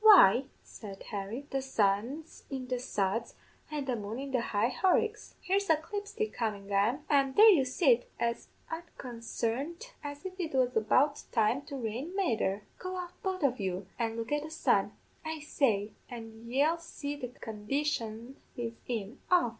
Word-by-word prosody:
"'Why,' 275 - +9 0.2
said 200 -3 -9
Harry, 210 +7 -4
'the 270 - 0
sun's 255 +5 0
in 265 -2 -4
the 250 -1 0
suds 225 -2 -1 0.3
an' 300 -2 -3
the 255 -2 0
moon 215 +1 -4
in 275 +1 -5
the 255 -2 +2
high 225 +2 +1
Horicks! 430 +6 +1
Here's 395 +1 +1
a 320 - +7
clipstick 410 +6 -4
comin' 205 -4 -2
an, 220 +9 +2
an' 275 -2 +3
there 435 +1 +10
you 310 -9 +5
sit 255 -3 +3
as 235 0 -1 0.2
unconsarned 280 - -4
as 290 +3 -6
if 375 0 -6
it 320 -6 -2
was 250 -1 +3
about 265 +7 +4 0.2
to 250 +6 +2
rain 255 - -3
mether! 220 - +1 0.2
Go 370 0 -4
out 355 -1 -4
both 375 -3 -2
of 260 -3 +2
you, 190 -1 -2
an' 225 -1 0
look 230 +2 -4
at 295 0 +2
the 310 - -6
sun, 315 - +2 0.3
I 315 0 -3
say, 225 -8 +1 0.2
and 230 -1 -8
ye'll 300 +6 +3
see 290 -3 -5
the 260 -3 -4
condition 235 +1 -3 0.2
he's 230 -1 -3
in 230 +1 -3
off!' 355 -9 +5
260 Hz, 165 wpm, -31 LUFS, 225-315 Hz, 0.3 s, there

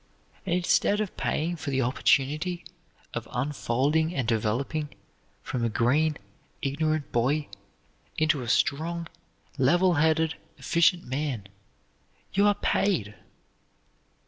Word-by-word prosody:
And 175 - +2
instead 180 +3 +2
of 215 -3 -3
paying 170 +3 -1
for 155 - -5
the 135 -1 +1
opportunity 150 +7 +1 0.5
of 120 -2 -4
unfolding 145 +5 0
and 130 -6 -1
developing 120 +7 -1 0.5
from 125 -2 -3
a 115 - +1
green, 145 +8 +2 0.5
ignorant 155 +2 -1
boy 140 +6 +1 0.7
into 155 -3 +2
a 120 - -5
strong, 165 +6 0 0.5
level 175 +8 +4
headed, 160 +1 +2 0.2
efficient 170 +1 +2
man, 130 -5 -3 0.9
you 200 +1 +4
are 205 - +4
paid! 160 - 0
150 Hz, 110 wpm, -27 LUFS, 130-170 Hz, 0.9 s, level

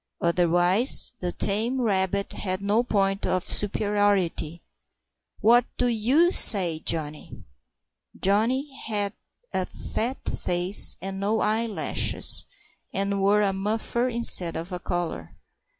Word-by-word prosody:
Otherwise, 175 - +3
the 180 -1 -4
tame 225 +9 0
rabbit 200 -3 -1
had 185 -2 -4
no 205 +3 0
point 195 -4 -1
of 185 0 -2
superiority. 205 -6 -1 0.8
"What 240 +2 +4
do 250 - 0
you 250 +9 +2
say, 180 - +3
Johnny?" 155 -2 -3 0.8
Johnny 250 +8 0
had 205 -2 0 0.4
a - - -2
fat 245 +4 -5
face 180 +3 +3
and 195 0 -6
no 210 +3 -1
eyelashes, 220 0 +1 0.5
and 200 0 -2
wore 205 +2 +2
a 195 -1 0
muffler 220 +5 -3
instead 230 -8 +3
of 165 +4 -7
a 180 - -5
collar. 175 -2 -6
200 Hz, 115 wpm, -24 LUFS, 185-225 Hz, 0.8 s, What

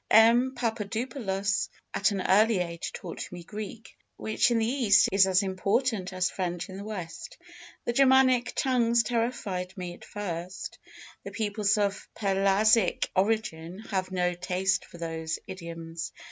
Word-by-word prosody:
M. 240 +4 +6
Papadopoulos 220 -3 -2 0.2
at 195 - +3
an 200 -2 -2
early 215 +2 +5
age 170 -1 -3
taught 175 - -7
me 175 -1 -8
Greek, 215 +4 -8 0.2
which 220 +3 +1
in 240 - +2
the 225 - +2
East 235 -5 +4
is 195 0 +5
as 185 0 +3
important 195 +2 0
as 185 0 +1
French 175 -1 -3
in 190 - -7
the 200 - -6
West. 210 - -7 0.5
The 240 - 0
Germanic 260 -2 +4
tongues 235 -3 +3
terrified 215 -5 -2
me 180 -1 -5
at - - -14
first, 185 -3 -6 0.4
the - - -6
peoples 210 -1 0
of 200 -1 -1
Pelasgic 195 +1 +3
origin 185 -4 0
having 190 -3 -3
no 180 0 +1
taste 185 +2 0
for - - -13
those 160 -1 -3
idioms. 170 -3 -7
200 Hz, 145 wpm, -28 LUFS, 180-225 Hz, 0.5 s, M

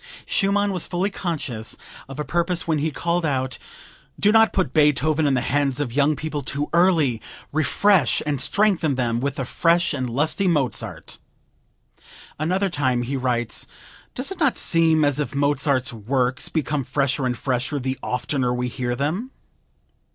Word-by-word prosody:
Schumann 200 0 +1
was 180 - -2
fully 185 +3 -1
conscious 145 - -4 0.3
of 135 - -8
a 150 - -2
purpose 175 0 -1
when 155 -2 +1
he 155 +2 0
called 170 +3 -1
out, 130 -4 -1 0.6
"Do 205 - +4
not 225 0 +5
put 185 - -1
Beethoven 150 0 +3
in 135 - +2
the 125 - +1
hands 140 0 0
of 135 -5 -2
young 145 +2 +3
people 155 0 -4
too 140 +2 -3
early; 165 -9 +3 0.3
refresh 155 +1 +3
and 145 -3 -1
strengthen 170 -3 +2
them 120 -2 0
with 140 +2 -2
the 135 - -3
fresh 170 +6 +2
and 130 -3 -2
lusty 155 - 0
Mozart." 145 -8 -2 1.2
Another 185 +6 +1
time 130 -8 0
he 135 +3 -3
writes: 120 -3 -1 0.5
"Does 260 +9 -2
it 385 - -7
not 290 -6 +2
seem 160 -2 +3
as 145 0 +1
if 150 0 -3
Mozart's 140 -2 +1
works 125 +4 -1
become 150 -2 -1
fresher 135 0 0
and 125 -1 -2
fresher 130 +2 -1
the 130 -1 -3
oftener 125 0 -1
we 125 0 -1
hear 120 -1 -3
them?" 160 - -2
145 Hz, 160 wpm, -23 LUFS, 130-170 Hz, 1.2 s, not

